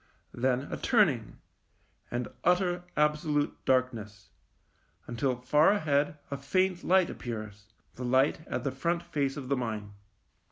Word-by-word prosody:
Then 130 +1 +1
a - - -2
turning, 150 - +2 0.7
and 120 0 -2 0.2
utter, 180 0 +2
absolute 150 0 +1
darkness, 110 -7 -1 0.7
until 125 +2 -1
far 150 +6 +4
ahead 150 -6 +1
a 140 - -2
faint 185 +6 0
light 185 -1 +3
appears, 110 -3 -7 0.3
the 125 - -7
light 130 +5 +3
at - - -3
the 140 - -1
front 170 +6 -1
face 145 -5 -2
of 135 -3 -6
the 140 +1 +1
mine. 110 -4 -4
140 Hz, 130 wpm, -29 LUFS, 120-165 Hz, 0.7 s, far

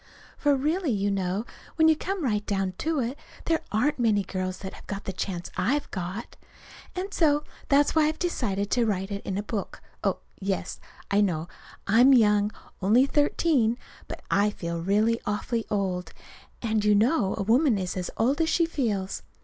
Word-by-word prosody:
For 290 -1 +2
really, 310 +5 0
you 205 -3 +1
know, 195 +2 -1 0.3
when 320 -1 +5
you 320 - +6
come 380 +2 -3
right 210 -5 0
down 195 -2 -1
to 320 -2 0
it, 250 +5 -3 0.3
there 325 -1 +1
aren't 260 +7 +1
many 215 -4 +3
girls 185 -1 -3
that 190 -1 -7
have - - -14
got 200 0 -5
the 190 - -4
chance 180 -1 -4
I've 245 +11 0
got. 190 +5 -5 0.6
And 385 +3 -4
so 295 -3 +3 0.3
that's 285 +1 +4
why 315 -1 +4
I've 310 - -1
decided 205 - -1
to 240 -2 +2
write 195 -1 -1
it 200 0 -4
into 195 +1 -1
a - - -12
book. 210 -1 -4 0.2
Oh, - - +1 0.2
yes, 195 0 -3 0.3
I 200 +1 +4
know 170 -5 0 0.4
I'm 245 +7 +6
young 210 -3 +4 0.3
only 220 +8 +5
thirteen. 280 -5 +2 0.3
But - - -8
I 205 +1 +4
feel 170 -4 -4
really 215 +6 +2
awfully 220 +2 -1
old; 190 -3 -2 0.5
and 220 -2 +1
you 210 0 +4
know 215 -1 +2
a 200 - -1
woman 240 +3 +3
is 185 -2 -3
as 180 -1 -3
old 270 +8 +2
as 320 - +2
she 335 - +3
feels. 215 - -2
215 Hz, 180 wpm, -26 LUFS, 195-280 Hz, 0.6 s, you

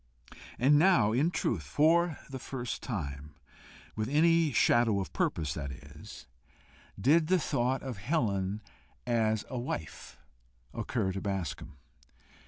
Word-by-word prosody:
And 145 +4 +5
now 155 - +4
in 135 +9 +2
truth 115 - -1
for 160 - +2
the 135 -1 -7
first 125 -1 -5
time, 75 - -5 0.6
with 110 +2 -2
any 165 +1 +3
shadow 120 -4 +3
of 95 - -5
purpose, 75 -3 -1
that 70 -3 -5
is, 65 - -12 0.7
did 155 +9 +4
the 185 +2 +4
thought 130 -5 -1
of 130 -5 -5
Helen 100 - -1 0.4
as 110 -3 +1
a 130 - -4
wife 80 - -6 0.6
occur 105 -7 -2
to 95 +1 -5
Bascombe. 95 -7 -4
120 Hz, 125 wpm, -30 LUFS, 95-145 Hz, 0.7 s, And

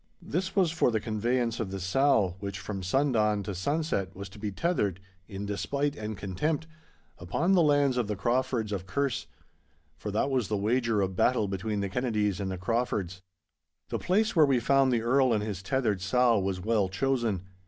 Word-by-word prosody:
This 185 +4 -3
was 185 -5 +3
for 160 -6 +2
the 110 -2 0
conveyance 115 +2 -1
of 110 -4 -2
the 95 0 -5
sow, 95 -1 +2
which 100 0 -5
from 100 -2 -5
sundawn 105 -1 +1
to 100 - -4
sunset 100 - -1
was 100 0 -7
to 100 - -13
be 105 0 -3
tethered, 100 - 0 0.3
in 100 -1 -6
despite 140 +8 -1
and 110 -4 -5
contempt, 145 - -2 0.5
upon 95 - 0
the 180 - +5
lands 145 -4 +3
of 120 -4 0
the 105 - -2
Craufords 120 +1 0
of 95 -2 -4
Kerse. 130 - -1 0.7
For 105 - -5
that 110 +7 0
was 125 -6 +1
the 105 - -1
wager 115 +1 +1
of 95 -1 -1
battle 110 0 +2
between 100 +2 -2
the 100 - -2
Kennedies 105 -4 0
and 95 -1 -2
the 95 - -3
Craufords. 95 -3 -2 0.7
The - - -2
place 210 +4 +1
where 155 -3 +6
we 135 -3 +3
found 135 +2 +3
the 115 -2 +1
Earl 130 +1 +3
and 105 -1 0
his 105 -4 -4
tethered 105 -2 0
sow 115 +2 +3
was 95 -1 -2
well 105 -1 +1
chosen. 115 -3 0
110 Hz, 190 wpm, -28 LUFS, 100-130 Hz, 0.7 s, where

